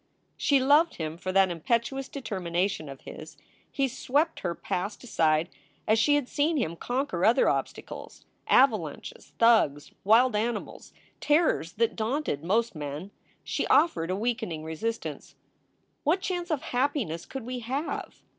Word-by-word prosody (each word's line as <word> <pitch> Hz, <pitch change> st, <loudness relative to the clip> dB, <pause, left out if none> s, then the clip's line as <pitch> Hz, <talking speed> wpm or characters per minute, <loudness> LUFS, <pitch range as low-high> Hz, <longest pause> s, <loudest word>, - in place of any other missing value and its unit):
She 280 Hz, -2 st, +3 dB
loved 290 Hz, +6 st, +4 dB
him 160 Hz, -1 st, -4 dB
for 185 Hz, +2 st, -4 dB
that 190 Hz, -1 st, +4 dB
impetuous 235 Hz, -, -1 dB
determination 185 Hz, -, -2 dB
of 135 Hz, -1 st, -10 dB
his. 155 Hz, 0 st, -10 dB, 0.3 s
He 275 Hz, -1 st, +1 dB
swept 290 Hz, +6 st, 0 dB
her 170 Hz, -2 st, -3 dB
past 200 Hz, +2 st, -4 dB
aside 160 Hz, -8 st, +2 dB, 0.4 s
as 220 Hz, +1 st, +4 dB
she 290 Hz, +5 st, +4 dB
had 290 Hz, -4 st, 0 dB
seen 300 Hz, +4 st, +1 dB
him 190 Hz, -, -1 dB
conquer 245 Hz, -3 st, -2 dB
other 235 Hz, +6 st, +5 dB
obstacles -, -, -4 dB, 0.2 s
avalanches, 215 Hz, -, +1 dB
thugs, 220 Hz, -12 st, +3 dB
wild 230 Hz, +3 st, +5 dB
animals, 220 Hz, +1 st, -3 dB, 0.3 s
terrors 295 Hz, -, +2 dB
that 230 Hz, +3 st, 0 dB
daunted 225 Hz, -, -2 dB
most 225 Hz, +7 st, +1 dB
men. 150 Hz, +5 st, -6 dB, 0.3 s
She -, -, -2 dB
offered 275 Hz, -, +3 dB
a 185 Hz, -, 0 dB
weakening 220 Hz, -7 st, -2 dB
resistance: 190 Hz, +9 st, -5 dB, 0.7 s
"What 330 Hz, +6 st, +2 dB
chance 355 Hz, -2 st, -3 dB
of 305 Hz, -5 st, -1 dB
happiness 245 Hz, -, -1 dB
could 265 Hz, -4 st, -6 dB
we 250 Hz, 0 st, -4 dB
have?" 265 Hz, +7 st, -4 dB
225 Hz, 140 wpm, -27 LUFS, 170-270 Hz, 0.7 s, other